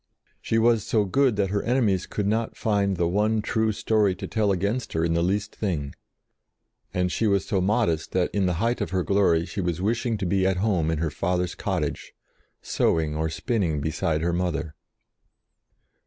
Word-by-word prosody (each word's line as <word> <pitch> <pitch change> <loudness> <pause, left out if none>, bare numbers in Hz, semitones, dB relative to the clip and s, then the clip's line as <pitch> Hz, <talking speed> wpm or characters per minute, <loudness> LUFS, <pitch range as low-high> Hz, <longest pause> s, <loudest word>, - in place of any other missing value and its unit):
She 115 - 0
was 115 -2 +3
so 105 -1 +1
good 130 +4 +2
that 100 -2 0
her 100 0 0
enemies 110 -7 +1
could 105 - -3
not 110 +2 -1
find 100 -3 +1
one 105 +6 +1
true 110 0 +1
story 105 -2 +1
to - - -6
tell 105 -2 0
against 100 +7 -1
her 80 0 +1
in 85 - +1
the 85 - +1
least 100 +4 -1
thing; 75 -9 -2 1.0
and 90 -1 0
she 115 - 0
was 100 -2 +2
so 95 -3 0
modest 95 -5 0
that 90 -1 0
in 100 -2 +1
the 90 - 0
height 115 +7 0
of - - -1
her 95 0 0
glory 90 -5 +2
she 100 - -4
was 85 -2 -2
wishing 115 +3 0
to 100 - -3
be 95 +1 +1
at 95 -1 +1
home 90 -5 +1
in 80 - 0
her 80 0 -1
father's 90 +3 -1
cottage, - - -3 0.5
sewing 80 -2 +1
or 80 +1 -1
spinning 90 - -1
beside 80 +1 -1
her 85 +1 0
mother. 85 -3 -2
95 Hz, 185 wpm, -25 LUFS, 85-110 Hz, 1.0 s, was